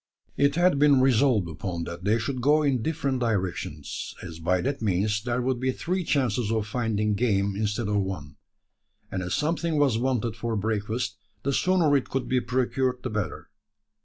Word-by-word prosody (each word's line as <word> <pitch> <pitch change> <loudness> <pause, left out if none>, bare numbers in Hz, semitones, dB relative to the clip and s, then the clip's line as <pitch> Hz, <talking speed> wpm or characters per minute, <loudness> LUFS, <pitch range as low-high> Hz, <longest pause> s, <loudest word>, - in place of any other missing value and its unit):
It 140 0 +3
had 175 -4 +3
been 145 -2 +6
resolved 130 -6 +3
upon 85 +1 -4
that 85 +2 -7
they 105 +3 +3
should 125 +3 -3
go 150 +4 +4
in 135 -5 +1
different 140 -2 -1
directions: 95 - -3
as 80 0 -8
by 90 +3 +1
that 140 0 -2
means 105 +1 +1
there 120 +2 -1
would 130 -1 0
be 130 +1 +1
three 180 +7 -2
chances 125 -7 0
of 110 -2 0
finding 110 -2 0
game 100 -3 +1
instead 105 +2 -1
of 105 0 +1
one; 90 -7 -5 0.7
and 95 - -2
as 90 -1 -2
something 160 +1 0
was 135 -6 +3
wanted 120 -3 0
for 115 0 -2
breakfast, 105 -1 -2 0.2
the 140 - 0
sooner 175 -3 +3
it 135 - 0
could 135 -1 -2
be 125 -1 +2
procured 125 +1 0
the 130 - -3
better. 105 -1 -4
120 Hz, 180 wpm, -26 LUFS, 100-135 Hz, 0.7 s, been